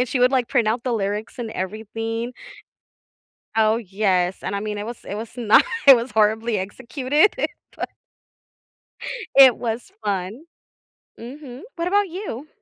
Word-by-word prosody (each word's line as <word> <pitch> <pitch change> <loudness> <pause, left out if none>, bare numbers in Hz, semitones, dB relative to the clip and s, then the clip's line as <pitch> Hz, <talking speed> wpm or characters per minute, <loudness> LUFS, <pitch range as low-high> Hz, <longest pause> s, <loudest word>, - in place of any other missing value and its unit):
And 250 - +1
she 260 - -1
would, 250 +2 +4
like, 250 -3 +1
print 240 -5 +2
out 230 +2 0
the 250 - 0
lyrics 210 +2 -3
and 235 -2 -4
everything. 225 +4 -4 1.2
Oh, 220 0 +4
yes. 190 -3 0
And, - - -3
I 200 - -2
mean, 210 0 -4
it 205 - -5
was 235 0 -6
it - - -6
was 220 +1 -7
not 225 -3 +5 0.2
it 270 -2 +11
was 235 +2 -3
horribly 220 +1 +2
executed, 260 - +1 0.4
but - - -4 1.5
it 265 -3 +9
was 230 0 -4
fun. 200 - -3 0.8
Mhm. 255 +2 -9
What 340 0 -2
about 405 0 +2
you? 325 - -6
230 Hz, 150 wpm, -22 LUFS, 210-255 Hz, 1.5 s, it